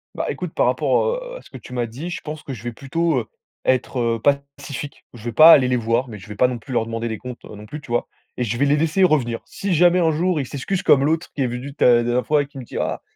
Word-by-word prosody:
Bah, - - -2
écoute, - - -4
par - - +2
rapport, - - +2
heu, - - -7
à - - -12
ce - - -18
que - - -9
tu 125 - -12
m'as 120 -1 -1
dit, 145 +10 -7
je - - -5
pense 155 0 -7
que 140 - -6
je 110 - -9
vais 120 - -3
plutôt, 150 +5 -1
heu, 115 - -1 0.4
être, 130 0 +1
heu, 115 -1 0 0.4
pacifique. 145 0 -7
Je 115 - -12
vais 120 - -3
pas 155 +8 +9
aller 130 -5 +7
les 125 - +1
voir, 120 +2 0
mais 105 -3 -9
je 100 - -13
vais 105 - -7
pas 125 - +4
non 125 -2 -4
plus 130 - -11
leur 115 -2 +1
demander 115 +1 -3
des 110 -1 -3
comptes, 125 -1 -9
non 105 0 -10
plus, 150 +8 -8
tu - - -15
vois? 120 0 0 0.3
Et 125 - 0
je 115 0 -2
vais 140 - +2
les 145 +1 +3
laisser 160 +5 +2
revenir. 130 -10 +2
Si 200 -2 -3
jamais 175 +2 +5
un 165 -2 +3
jour, 170 +1 0
ils 135 - -2
s'excusent 180 +7 -3
comme 135 -1 +5
l'autre 160 +3 0
qui 140 - -2
est 130 - +2
venu 125 +3 -6
ta - - +1
la 120 - +2
dernière 120 0 0
fois 150 -1 +3
et - - -8
qui 140 -2 -11
me - - -7
dit: - - -8
«Ah, - - -2
130 Hz, 305 wpm, -21 LUFS, 120-155 Hz, 0.4 s, pas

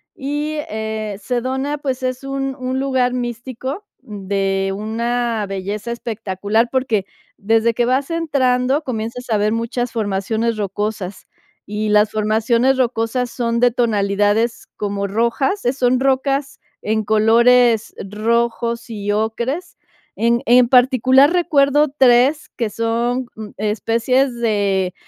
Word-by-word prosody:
Y, 295 +3 -3
eh, 220 -3 -4
Sedona, 260 +5 -2
pues, 265 -2 -3
es 255 +1 -2
un 270 0 -3
un 255 +1 -2
lugar 260 -2 +1
místico 250 - -5 0.2
de 195 -1 -2
una 230 +1 -2
belleza 200 +4 -4
espectacular, 220 -1 -1
porque 235 -7 0 0.3
desde 225 +2 +2
que 240 +1 +1
vas 265 +4 0
entrando 275 -4 +1
comienzas 240 -1 -5
a 215 - +2
ver 210 +1 +1
muchas 235 +1 -2
formaciones 220 +1 -1
rocosas. 205 -1 -4 0.4
Y 210 +1 -3
las 210 0 +4
formaciones 225 +4 +1
rocosas 245 0 0
son 235 -1 -1
de 245 - +5
tonalidades 215 0 0
como 200 -1 -2
rojas, 235 - 0
eh, 245 - +2
son 250 -1 +1
rocas 275 +1 0 0.2
en 220 +1 -1
colores 225 +2 +4 0.2
rojos 235 +2 -1
y 205 -2 -3
ocres. 235 - -2 0.4
En 235 +1 +1
en 245 +1 +5
particular, 260 +3 +5
recuerdo 295 -4 +3
3 260 +3 +4
que 230 -3 -1
son, 235 +3 -1
mm, 215 -1 -8
especies 230 +5 0
de 200 -5 0
235 Hz, 120 wpm, -19 LUFS, 215-255 Hz, 0.4 s, de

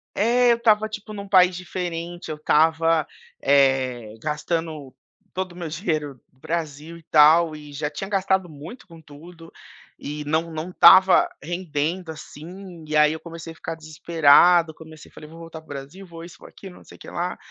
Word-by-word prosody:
É, 240 +3 +3
eu 235 - +2
estava 220 -2 +2
tipo, 215 0 -8
num 200 -1 -8
país 185 -2 +4
diferente, 175 -1 -6
eu 155 - -5
estava, 160 +1 +2 0.3
eh, 130 -5 +1
gastando 155 -1 -4 0.4
todo 185 -1 -4
o - - -17
meu 175 -2 -6
dinheiro 155 -4 -3 0.2
do 130 - -32
Brasil 160 +1 -5
e 165 - -18
tal 155 +1 +4
e 150 -1 -12
já 145 +1 -3
tinha 175 +6 -7
gastado 190 -2 0
muito 160 - -12
com 165 -3 -15
tudo. 165 +3 -15 0.5
E 150 +1 -6
não 160 +3 -1
não 160 +2 -6
estava 185 +1 +6
rendendo, 170 +1 -3
assim. 170 +2 -11
E 155 - -3
aí, 150 0 +5
eu 160 - -7
comecei 165 0 -10
a - - -23
ficar 165 - -6
desesperado. 160 +1 +3
Comecei 155 -1 -14
falei: 150 - -13
"Vou 165 +1 -13
voltar 165 -1 -10
para - - -26
o - - -26
Brasil, 145 +8 -9
vou 165 -2 -11
isso 170 0 -12
vou - - -14
aquilo 190 -2 -13
não - - -16
sei - - -16
que - - -11
lá". 175 +1 -4
165 Hz, 185 wpm, -23 LUFS, 150-180 Hz, 0.5 s, estava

